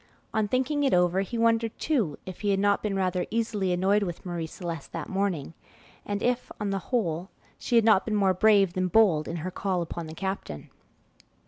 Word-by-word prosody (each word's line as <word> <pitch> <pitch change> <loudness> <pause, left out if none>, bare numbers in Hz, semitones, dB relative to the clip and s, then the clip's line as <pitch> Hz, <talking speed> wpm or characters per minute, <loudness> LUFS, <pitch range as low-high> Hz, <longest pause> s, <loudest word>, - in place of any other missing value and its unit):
On 215 -1 +1
thinking 265 +6 0
it 270 - +3
over, 180 +1 +3
he 230 +5 -4
wondered 230 -1 +2
too 225 - 0
if 185 -1 -8
he 205 - 0
had 195 -1 +2
not 205 0 +2
been 210 -2 -2
rather 185 -1 0
easily 215 -4 -1
annoyed 190 +4 +2
with 175 -3 -4
Marie 170 -2 -3
Celeste 165 -3 -6
that - - -4
morning, 190 -7 -1 0.5
and 205 +1 -2
if, 245 0 0
on 205 -1 -2
the 195 - -1
whole, 180 -7 -1 0.3
she 245 - -1
had 230 -2 +5
not 215 -4 +5
been 220 - -1
more 195 -2 +3
brave 195 -1 +4
than 185 0 0
bold 180 -7 +4
in 165 - -4
her 185 - -3
call 185 -2 -1
upon 170 0 -6
the 160 - -9
captain.. 190 - -5
195 Hz, 205 wpm, -27 LUFS, 180-220 Hz, 0.5 s, had